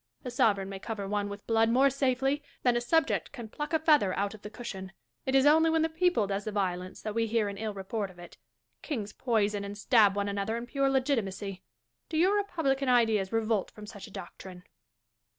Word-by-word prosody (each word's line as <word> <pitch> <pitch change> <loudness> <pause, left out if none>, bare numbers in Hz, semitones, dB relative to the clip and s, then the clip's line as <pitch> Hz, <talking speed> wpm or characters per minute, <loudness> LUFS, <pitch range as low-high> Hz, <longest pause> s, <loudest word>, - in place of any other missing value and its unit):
A 250 - -4
sovereign 215 -6 +2
may 195 0 -6
cover 205 -1 -5
one 205 0 -1
with 200 0 -8
blood 225 0 +3
more 265 +4 +4
safely 270 +1 +1 0.2
than 245 -1 +3
a 240 - +1
subject 320 +7 +1
can 240 -5 -8
pluck 295 +7 -5
a 320 - +4
feather 300 - +3
out 200 +1 -1
of 215 - -12
the 210 - -7
cushion. 195 -5 -7 0.3
It 265 - +1
is 270 0 +5
only 320 +2 +6
when 320 0 +2
the 325 - +1
people 325 - +2
does 200 +1 -2
the 215 - -3
violence 185 -3 -3
that 215 - -3
we 230 +1 0
hear 220 -1 +1
an 200 - -7
ill 215 -2 -3
report 200 +1 -3
of 185 - -16
it. 175 -1 -12 0.5
Kings 215 -8 -4
poison 210 -4 0
and 200 0 -6
stab 215 -3 +4
one 200 0 -1
another 200 +3 -2
in 235 - -5
pure 275 +2 0
legitimacy. 210 -8 -1 0.5
Do 315 - -2
your 370 +5 +4
republican 280 -10 0
ideas 225 -6 +3
revolt 220 -3 0
from 210 - -11
such 205 0 -10
a - - -14
doctrine 185 -1 -9
225 Hz, 215 wpm, -29 LUFS, 200-270 Hz, 0.5 s, only